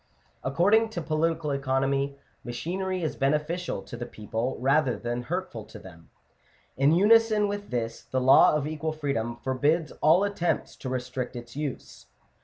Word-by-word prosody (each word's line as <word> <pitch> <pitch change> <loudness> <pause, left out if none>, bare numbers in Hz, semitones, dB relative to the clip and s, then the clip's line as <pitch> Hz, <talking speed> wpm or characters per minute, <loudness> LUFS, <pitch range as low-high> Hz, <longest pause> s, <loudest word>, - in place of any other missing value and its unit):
Ac* 135 +1 -3
cording 220 +7 +4
to 220 - -4
political 160 0 0
economy, 135 0 0 0.3
machinery 185 +9 -3
is 155 - -2
beneficial 150 - -1
to - - -9
the 120 0 -6
people, 110 +4 -3
rather 135 0 +2
than 120 0 -3
hurtful 155 - -4
to - - -12
them: 85 -3 -14 0.7
in 135 +3 +4
unison 215 +3 +5
with 205 0 -5
this 115 -2 -3
the 130 - -2
law 130 +3 +6
of 150 -2 0
equal 155 +1 -3
freedom 135 -7 -2
forbids 145 +5 +1
all 165 +5 +5
attempts 200 -4 -1
to 130 - -6
restrict 125 0 -4
its 120 0 -9
use. 145 -3 -6
145 Hz, 155 wpm, -27 LUFS, 125-170 Hz, 0.7 s, law